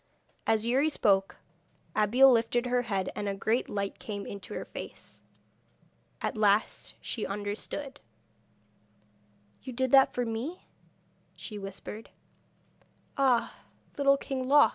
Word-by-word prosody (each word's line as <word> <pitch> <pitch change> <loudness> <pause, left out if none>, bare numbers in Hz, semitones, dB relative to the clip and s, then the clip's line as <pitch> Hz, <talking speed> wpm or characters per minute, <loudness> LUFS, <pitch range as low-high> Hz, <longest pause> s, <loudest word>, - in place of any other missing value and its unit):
As 220 0 +2
Youri 265 +6 +3
spoke 195 -9 +2 0.6
Abeille 215 +5 +5
lifted 235 +1 +2
her 245 0 +2
head, 195 -6 -2
and 205 -1 -2
a 195 - -2
great 220 +5 0
light 200 -1 -3
came 205 -2 -5
into 200 -1 -7
her - - -4
face. - - -10 1.0
At - - -1
last 205 0 +2
she 225 - -4
understood. 210 +7 -4 1.6
'You 255 - -7
did 260 +1 0
that 270 -1 +7
for 245 - 0
me?' 235 +11 -4 0.7
she 210 -3 -6
whispered. 195 +3 -8 1.1
'Ah, 260 -4 +2 0.4
Little 275 -1 +4
King 265 -2 -4
Loc 290 +2 +7
230 Hz, 120 wpm, -29 LUFS, 205-260 Hz, 1.6 s, that